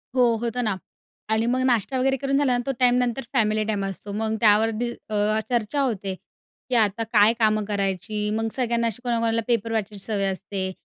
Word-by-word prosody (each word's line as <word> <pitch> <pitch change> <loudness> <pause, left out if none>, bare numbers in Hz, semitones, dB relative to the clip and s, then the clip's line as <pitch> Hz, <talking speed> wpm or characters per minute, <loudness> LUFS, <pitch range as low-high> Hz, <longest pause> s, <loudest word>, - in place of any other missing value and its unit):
हो, 245 -2 +4
होतं 240 +1 -1
ना 215 -4 0 0.5
आणि 220 +1 +2
मग 255 +2 +1
नाश्ता 250 +1 +1
वगैरे 270 +1 +2
करून 275 +1 0
झालं 280 -2 +2
ना 245 - -3
तो 275 - 0
टाईमनंतर 250 0 +2
फॅमिली 215 -3 +2
टाईम 205 -2 -1
असतो. 195 +1 -6
मग 220 +1 -1
त्यावर 220 0 +5
दि 240 0 -1 0.2
अ, 215 0 +1
चर्चा 240 +3 0
होते 200 -7 -2 0.5
की 255 - +1
आता 220 -1 +2
काय 210 +1 +6
कामं 215 -1 +2
करायची 205 +1 -2
मग 225 0 -1
सगळ्यांना 235 -2 +1
अशी 230 +2 -4
कोणा-कोणाला 230 -2 +1
पेपर 230 -2 0
वाचायची 205 -2 -3
सवय 205 -3 -1
असते 190 0 -4
225 Hz, 190 wpm, -24 LUFS, 210-245 Hz, 0.5 s, काय